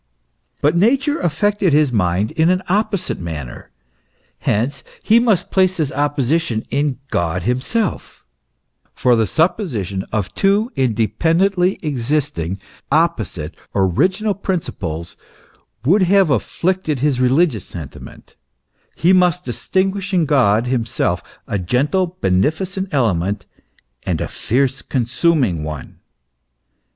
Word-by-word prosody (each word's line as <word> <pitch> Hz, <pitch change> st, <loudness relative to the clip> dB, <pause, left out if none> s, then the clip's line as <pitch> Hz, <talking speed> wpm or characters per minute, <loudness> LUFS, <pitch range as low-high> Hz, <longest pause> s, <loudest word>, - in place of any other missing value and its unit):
But 150 Hz, +3 st, +3 dB
Nature 270 Hz, -, +2 dB
affected 190 Hz, +2 st, +1 dB
his 150 Hz, -3 st, +3 dB
mind 95 Hz, +1 st, +1 dB
in 160 Hz, +1 st, +2 dB
an 185 Hz, +1 st, +1 dB
opposite 200 Hz, -1 st, -1 dB
manner; 75 Hz, -7 st, -7 dB, 0.7 s
hence 130 Hz, +7 st, -1 dB, 0.2 s
he 225 Hz, +2 st, +5 dB
must 215 Hz, -7 st, +1 dB
place 185 Hz, -1 st, +2 dB
this 155 Hz, -5 st, -1 dB
opposition 145 Hz, -3 st, 0 dB
in 140 Hz, -1 st, 0 dB
God 85 Hz, -2 st, -1 dB
himself, 130 Hz, -, -2 dB, 0.7 s
for 125 Hz, -1 st, +3 dB
the 110 Hz, -2 st, +1 dB
supposition 120 Hz, -, 0 dB
of 105 Hz, -4 st, -2 dB
two 205 Hz, +4 st, +2 dB
independently 165 Hz, -, +1 dB
existing, 135 Hz, -, -1 dB, 0.3 s
opposite, -, -, 0 dB, 0.2 s
original 180 Hz, -, +1 dB
principles 100 Hz, -, -4 dB, 0.7 s
would 190 Hz, +9 st, +4 dB
have 190 Hz, -2 st, +4 dB
afflicted 160 Hz, -, -1 dB
his 140 Hz, -3 st, +1 dB
religious 130 Hz, -, +2 dB
sentiment; 80 Hz, -7 st, -10 dB, 0.6 s
he 175 Hz, +3 st, +3 dB
must 180 Hz, -1 st, +3 dB
distinguish 190 Hz, +9 st, -1 dB
in 170 Hz, -3 st, +3 dB
God 120 Hz, -7 st, +3 dB
himself, 120 Hz, -2 st, -1 dB, 0.3 s
a 100 Hz, -, -1 dB
gentle, 150 Hz, -, 0 dB
bene 95 Hz, +3 st, +3 dB
ficent 190 Hz, +4 st, -4 dB
element, 100 Hz, -, 0 dB, 0.6 s
and -, -, -2 dB
a -, -, -2 dB
fierce 130 Hz, +2 st, -1 dB
consuming 125 Hz, -, +1 dB
one. 75 Hz, -3 st, -7 dB
145 Hz, 110 wpm, -19 LUFS, 110-185 Hz, 0.7 s, he